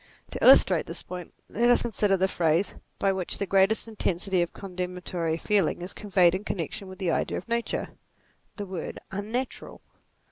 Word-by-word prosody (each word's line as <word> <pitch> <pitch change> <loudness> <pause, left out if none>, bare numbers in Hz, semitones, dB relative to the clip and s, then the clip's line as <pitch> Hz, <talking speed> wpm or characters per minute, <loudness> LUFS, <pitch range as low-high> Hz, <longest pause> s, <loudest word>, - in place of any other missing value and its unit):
To - - -4
illustrate - - +7
this - - -3
point, 180 -2 -8 0.2
let 235 +3 +1
us 245 - +5
con 235 - -3
sider 200 -1 +2
the 190 +1 +2
phrase 170 +1 +1 0.2
by 195 - +2
which 185 -2 -2
the 200 - -1
greatest 195 +4 +3
intensity 190 -4 -1
of 175 - -1
condemnatory 180 -3 -4
feeling 195 -2 +1
is 180 - -6
conveyed 185 -4 +3
in 190 +2 -3
connection 190 0 -4
with 185 0 -10
the 185 -4 -1
idea - - -1
of - - -8
nature 235 0 -2 0.7
the 205 - -5
word 185 -4 -6
unnatural. 220 +6 -4
190 Hz, 175 wpm, -27 LUFS, 180-205 Hz, 0.7 s, illustrate